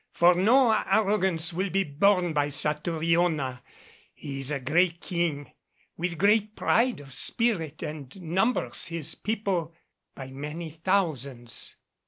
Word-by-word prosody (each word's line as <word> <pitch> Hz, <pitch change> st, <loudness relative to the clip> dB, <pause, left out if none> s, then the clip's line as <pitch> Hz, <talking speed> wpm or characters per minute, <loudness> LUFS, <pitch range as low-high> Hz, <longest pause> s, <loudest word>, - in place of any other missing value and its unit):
For 175 Hz, +1 st, +5 dB
no 230 Hz, +7 st, +4 dB
arrogance 190 Hz, -6 st, +1 dB
will 190 Hz, +3 st, -1 dB
be 195 Hz, +2 st, +1 dB
borne 180 Hz, +3 st, +2 dB
by 145 Hz, -1 st, +1 dB
Satouriona. 155 Hz, -2 st, 0 dB, 0.5 s
He 140 Hz, -2 st, -6 dB
is 135 Hz, 0 st, -1 dB
a 145 Hz, -2 st, -1 dB
great 165 Hz, +6 st, +1 dB
King, 170 Hz, -6 st, -2 dB, 0.4 s
with 175 Hz, 0 st, -3 dB
great 210 Hz, +3 st, +2 dB
pride 240 Hz, -, +2 dB
of 135 Hz, -2 st, -7 dB
spirit, 170 Hz, -, 0 dB
and 150 Hz, +2 st, -7 dB
numbers 190 Hz, +8 st, 0 dB
his 165 Hz, -4 st, -3 dB
people 195 Hz, -7 st, -2 dB, 0.4 s
by 130 Hz, -1 st, -8 dB
many 150 Hz, +4 st, -6 dB
thousands." 150 Hz, -9 st, -1 dB
170 Hz, 125 wpm, -27 LUFS, 150-195 Hz, 0.5 s, For